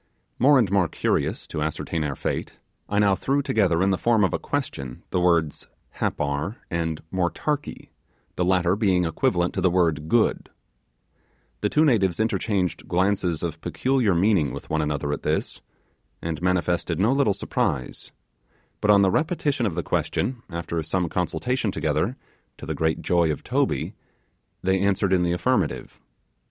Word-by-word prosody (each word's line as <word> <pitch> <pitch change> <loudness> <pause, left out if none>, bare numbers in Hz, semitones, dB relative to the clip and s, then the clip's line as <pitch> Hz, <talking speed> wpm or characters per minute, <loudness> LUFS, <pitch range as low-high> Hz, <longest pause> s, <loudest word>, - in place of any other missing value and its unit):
More 140 +3 +6
and 110 -7 +2
more 100 -4 +3
curious - - -1
to 75 - -5
ascertain 80 +1 -2
our 70 -2 -2
fate, - - -4 0.3
I 105 - -1
now 100 -1 +4
threw 140 +8 0
together 95 -8 +2
in 100 - +3
the 95 - 0
form 115 -3 +3
of 95 - +1
a - - 0
question 65 -2 -4
the - - +1
words 85 -4 +1 0.3
'Happar' 75 +7 -1 0.2
and 80 -2 -2
'Motarkee', 135 +11 -2 0.5
the 90 - 0
latter 90 0 +2
being 95 -4 +2
equivalent 85 +2 0
to 95 - -2
the 95 - +4
word 80 -4 +1
'good'. 120 -2 +2 1.1
The 105 - 0
two 155 +7 +3
natives 100 - +2
interchanged 95 -5 -1
glances 90 -2 0
of 80 -1 -4
peculiar 105 - +1
meaning 85 - +3
with - - -9
one 80 0 +1
another 75 -1 -1
at - - -4
this, - - -2 0.6
and 85 -1 -4
manifested 90 -2 0
no 105 +6 +3
little 140 -6 +3
surprise; 65 - -2 0.7
but 105 - 0
on 100 -1 +7
the 95 - +3
repetition 145 - 0
of 85 - -3
the 85 - -2
question 120 - -1
after 85 -1 -3
some 85 +2 -1
consultation 110 +6 -1
together, - - -1 0.4
to - - -9
the - - -2
great 80 0 -1
joy 85 -3 +2
of 75 - -5
Toby, - - 0 0.7
they 95 +1 +2
answered 100 0 +1
in 90 - +3
the 85 0 +1
affirmative. 125 +9 -1
90 Hz, 160 wpm, -24 LUFS, 85-105 Hz, 1.1 s, on